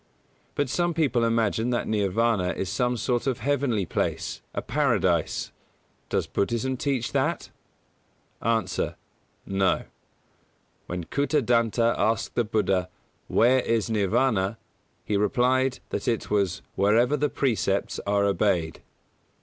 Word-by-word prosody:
But 145 - 0
some 170 +6 0
people 135 -7 +2
imagine 115 0 +1
that 120 -1 0
Nirvāna 105 -2 +1
is 95 - -2
some 125 +3 0
sort 120 +2 -1
of 130 -3 0
heavenly 130 -8 0
place, - - -2
a - - -3
Paradise. - - +1 0.6
Does - - 0
Buddhism 120 +5 -1
teach 130 -2 -1
that? - - -1 0.9
A. 110 -5 0 0.5
No. 95 -1 +1 1.0
When 90 -1 -4
Kūtadanta 120 - +2
asked 110 +2 0
the 120 - +1
Buddha 95 -4 0 0.4
"Where 130 +3 +4
is 115 -2 0
Nirvāna," 105 0 +1 0.5
he 105 - 0
replied 125 +5 +1
that - - -4
it 115 -3 -1
was 100 -4 0
"wherever 115 +8 +3
the 150 0 0
precepts 110 -7 0
are 100 0 +2
obeyed". 95 -5 0
115 Hz, 115 wpm, -26 LUFS, 100-125 Hz, 1.0 s, Where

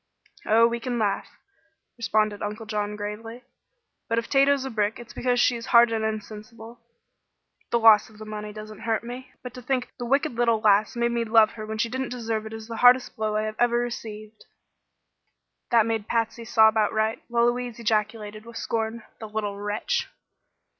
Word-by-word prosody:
"Oh, 230 +2 +5
we 235 0 0
can 245 0 -3
laugh," 205 -3 -1 0.7
responded 215 -3 0
Uncle 210 +2 -5
John, 210 -1 -3
gravely. 220 +4 -7 0.7
"But 230 - 0
if 230 - -1
Tato's 275 -1 +3
a 265 - -4
brick 210 -1 0
it's 240 0 -11
because 245 -1 0
she 240 - +3
is 235 +1 -7
hard 235 -1 +6
and 220 -1 -1
insensible. 220 +2 -6 0.9
The 235 - +2
loss 225 -2 +6
of 215 - -18
the 215 - -9
money 210 0 -6
doesn't 215 0 -10
hurt 225 0 -1
me, 245 +2 -8
but 250 -1 -7
to 250 - -9
think 255 0 -2
the 240 - -4
wicked 280 +5 +2
little 235 -2 +1
lass 215 0 +3
made 235 0 +1
me 235 0 0
love 220 -1 +5
her 215 -1 -8
when 220 0 -4
she 220 - +1
didn't 260 +2 -3
deserve 225 -3 -3
it 220 - -9
is 220 0 -8
the 230 -1 -6
hardest 250 +1 +5
blow 215 -1 -2
I 215 - +1
have 215 0 -4
ever 240 0 +3
received." 220 -3 -6 1.2
That 230 -2 +4
made 225 -2 -2
Patsy 230 0 -1
sob 220 -1 +5
outright, 220 +1 +1
while 235 0 +2
Louise 240 -1 -1
ejaculated, 215 -1 -2
with 230 0 -10
scorn: 225 0 -3 0.2
"The 220 - -8
little 210 -2 -3
wretch!" 205 +1 -2
225 Hz, 190 wpm, -25 LUFS, 215-235 Hz, 1.2 s, hard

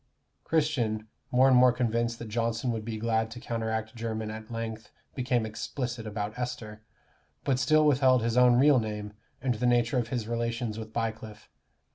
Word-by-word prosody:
Christian, 125 -9 0 0.2
more 130 +1 +5
and 130 - +5
more 125 0 +7
convinced 115 -1 0
that 115 - -7
Johnson 115 +2 -1
would 110 -2 -3
be 110 0 -4
glad 110 0 0
to 120 +2 -8
counteract 110 -1 -3
Jermyn 110 -1 -3
at 110 0 -8
length 115 -1 -5 0.2
became 125 -3 0
explicit 120 +1 -4
about 105 0 -4
Esther, 110 -3 -5 0.6
but 130 -2 +1
still 155 +3 +4
withheld 130 -4 +4
his 115 0 0
own 125 -1 +6
real 135 +1 +6
name, 105 -2 -4 0.3
and 130 -2 +2
the 120 +2 0
nature 120 +1 +3
of 115 - -2
his 120 -3 -3
relations 115 -1 -2
with 110 -1 -8
Bycliffe. 110 -2 -4
115 Hz, 170 wpm, -28 LUFS, 110-125 Hz, 0.6 s, more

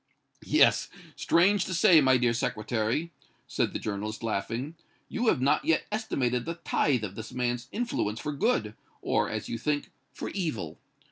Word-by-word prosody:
"Yet, - - +4 0.3
strange 195 +3 +3
to 185 - -3
say, 165 -1 +6
my 130 -2 +5
dear 120 -1 +2
Secretary," 115 +5 -1 0.4
said - - 0
the - - -3
journalist, 110 +1 -4
laughing, 115 +7 -2 0.4
"you 240 +1 -1
have 130 - +3
not 140 +3 +2
yet 165 - +2
estimated 125 - -1
the 165 - -3
tithe 140 -7 0
of 95 -3 -4
this 110 +3 -8
man's 125 -1 -2
influence 205 - -2
for 150 - -3
good, 140 - 0 0.3
or, - - +1
as - - -4
you 115 - -4
think, 145 +3 -1 0.2
for - - -6
evil. 115 - -4
125 Hz, 160 wpm, -28 LUFS, 110-165 Hz, 0.4 s, say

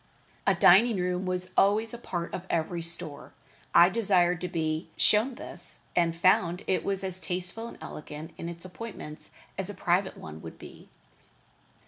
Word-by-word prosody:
A - - +5
dining 215 +5 +6
room 180 +1 -1
was 185 0 -1
always 215 +3 +3
a 235 - -6
part 175 -7 -4
of 185 +1 -5
every 170 +1 -1
store. 165 -3 -5 0.4
I 175 - +9
desired 180 -4 +2
to 180 - -2
be 160 -1 -2
shown 225 +5 +4
this, - - -4
and 170 -1 +2
found 175 0 +3
it 190 - 0
as 190 -2 -1
tasteful 185 +6 -2
and - - -10
elegant 150 +2 -8
in 170 - -6
its 170 +1 -9
appointments 185 -5 -9 0.3
as 195 0 -3
a 205 - -6
private 185 +2 0
one 80 0 -9
would 80 - -9
be. - - -13
180 Hz, 160 wpm, -28 LUFS, 170-195 Hz, 0.4 s, I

